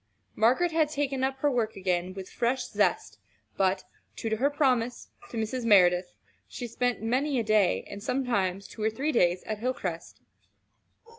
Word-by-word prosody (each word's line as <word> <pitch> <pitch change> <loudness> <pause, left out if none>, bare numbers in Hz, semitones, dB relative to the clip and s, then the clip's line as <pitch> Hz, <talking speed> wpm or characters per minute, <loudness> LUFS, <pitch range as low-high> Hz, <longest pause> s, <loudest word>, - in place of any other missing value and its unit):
Margaret 255 +11 +3
had 315 -2 +2
taken 280 -3 -1
up 265 0 0
her 290 - +3
work 230 -4 -1
again 185 -1 -1
with 190 -1 -7
fresh 250 +1 -1
zest, - - 0 0.4
but, 190 0 +1 0.3
true 225 - -4
to 220 - +1
her 275 +5 +2
promise 250 -5 0 0.2
to 235 - -6
Mrs. 225 +3 -2
Merideth, 180 -4 +4 0.3
she 245 - -6
spent 245 0 -1
many 260 +4 +1
a - - 0
day, 215 -3 +2
and 200 - -9
sometimes 200 -7 -1
two 225 - -10
or 215 - +2
three 270 +8 -2
days 180 - +2
at 215 -1 -4
Hilcrest. 205 -9 -4
230 Hz, 165 wpm, -28 LUFS, 195-260 Hz, 0.4 s, Merideth